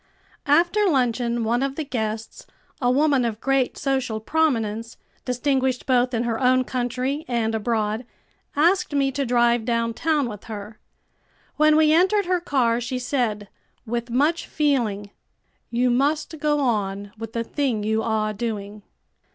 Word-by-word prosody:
After 345 +8 +3
luncheon 240 -4 +1
one 235 +3 +1
of 275 0 -1
the 315 - -3
guests, 220 -5 -4 0.3
a 245 - +2
woman 280 0 +3
of 225 -2 -2
great 270 0 0
social 265 -5 -1
prominence, 230 -5 -1 0.3
distinguished 260 0 0
both 250 -1 +2
in 230 - 0
her 230 -2 -1
own 255 0 +4
country 255 +4 -2
and 230 -2 0
abroad, 220 0 -1 0.5
asked 340 +1 +2
me 275 -1 +2
to 270 0 -2
drive 240 -1 +3
downtown 235 +5 0
with 210 -3 -8
her. 215 0 -8 0.8
When 305 0 +5
we 310 0 +5
entered 380 +4 +3
her 365 0 +1
car 245 -8 +1
she 245 +2 -3
said, 240 -5 -1 0.4
with 235 +1 -3
much 295 +8 +1
feeling 230 -9 0 0.6
"You 245 +1 +1
must 300 +5 0
go 295 0 +1
on 205 -5 -1
with 225 0 -8
the 230 - -1
thing 240 -4 -1
you 220 +1 +1
are 215 -1 0
doing." 210 -1 -5
245 Hz, 145 wpm, -23 LUFS, 225-280 Hz, 0.8 s, When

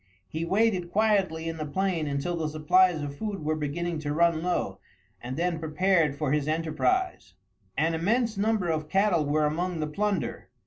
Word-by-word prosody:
He 160 - -3
waited 190 -1 +1
quietly 195 -6 +1
in 165 0 -3
the 155 - -3
plain 175 0 -1
until 140 +5 -2
the 160 -2 -2
supplies 155 +2 +3
of 140 -1 -5
food 200 -2 -4
were 155 +1 +1
beginning 160 +3 -2
to 145 -1 -3
run 170 -1 +3
low, 170 - -1 0.4
and 125 +3 -5
then 170 -1 0
prepared 160 -1 +2
for 150 -3 -1
his 150 -1 +1
enterprise. 165 - -1 0.4
An 165 +2 +2
immense 220 +7 +1
number 210 -2 +1
of 155 -2 -1
cattle 190 -5 +2
were 150 +1 +2
among 170 +3 -1
the 155 - 0
plunder. 200 +4 -2
165 Hz, 175 wpm, -27 LUFS, 155-190 Hz, 0.4 s, supplies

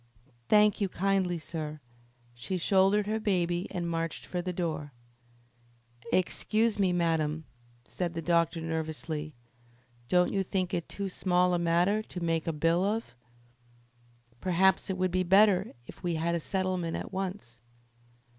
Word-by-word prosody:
"Thank 210 0 +5
you 195 - +1
kindly, 190 -1 0
sir." 155 -2 -6 0.5
She 120 +11 -4
shouldered 195 +3 +3
her 215 +2 -1
baby 175 -4 0
and 175 -1 -3
marched 165 -1 -3
for 180 - -3
the 180 +1 -3
door. 155 -5 -3 1.2
"Excuse 215 +4 +1
me, 190 -2 +3
madam," 160 -3 0 0.4
said 175 +3 -3
the 165 - -2
doctor 170 0 +2
nervously. 160 -1 -4 0.7
"Don't 180 0 +3
you 195 - +1
think 185 -1 -2
it 170 - -2
too 200 -1 -4
small 180 -1 +1
a 175 - +1
matter 175 +5 +2
to 185 - -8
make 165 -1 -1
a - - +2
bill 165 +3 +1
of? 210 - -2 1.2
Perhaps 190 +4 +2
it 190 - -1
would 185 0 0
be 185 +1 +1
better 195 +2 +4
if - - -12
we 175 -2 -1
had 165 +2 0
a 170 - 0
settlement 185 -1 -2
at - - -7
once." 185 - -5
180 Hz, 145 wpm, -29 LUFS, 165-190 Hz, 1.2 s, Thank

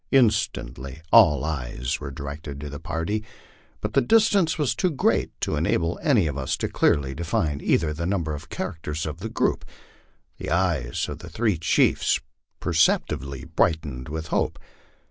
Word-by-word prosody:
Instantly 80 - +1
all 75 -3 +7
eyes 60 -5 -2
were - - -5
directed 70 +1 -7
to 75 0 -6
the 70 - -6
party, 85 +7 -2 0.6
but - - -3
the 135 - +5
distance 205 - +3
was 150 -5 +1
too 185 - +1
great 150 - +1
to - - 0
enable 85 +2 0
any 135 - +3
of 75 -2 -2
us 65 - -1
to - - -1
clearly 70 -2 +2
define 80 -2 -1
either 80 -2 +2
the 85 +3 -3
number 85 -5 -1
or 75 - -4
character 80 0 -5
of 80 +2 -5
the 110 +5 -4
group. - - 0 0.8
The - - -4
eyes 85 -8 0
of - - -6
the - - -9
three 110 -7 0
chiefs 80 - +3 0.4
percepti 80 -3 +2
bly 70 0 -7
brightened 75 -6 0
with 80 +1 -5
hope. - - 0
80 Hz, 165 wpm, -25 LUFS, 70-95 Hz, 0.8 s, all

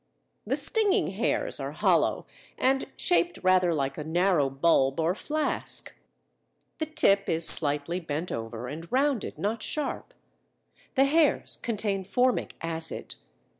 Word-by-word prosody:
The - - +1
stinging 435 -4 +1
hairs - - -2
are - - -5
hollow - - +1 0.3
and 270 +1 +1
shaped 355 -1 +1
rather 185 -1 +3
like 140 -2 -2
a - - -4
narrow 170 -2 +1
bulb 135 0 +2
or 165 +2 +1
flask; 305 +8 -3 0.8
the 315 - -2
tip 285 -11 +2
is 165 0 +2
slightly 150 +3 +4
bent 165 0 -4
over 115 +1 -5
and 165 - -8
rounded 270 -2 0
(not 215 +2 -2
sharp); 305 - -4 0.8
the 270 0 +5
hairs 305 +1 +2
contain 205 -4 -2
formic 250 +6 0
acid. 165 -1 -2
185 Hz, 130 wpm, -27 LUFS, 160-270 Hz, 0.8 s, the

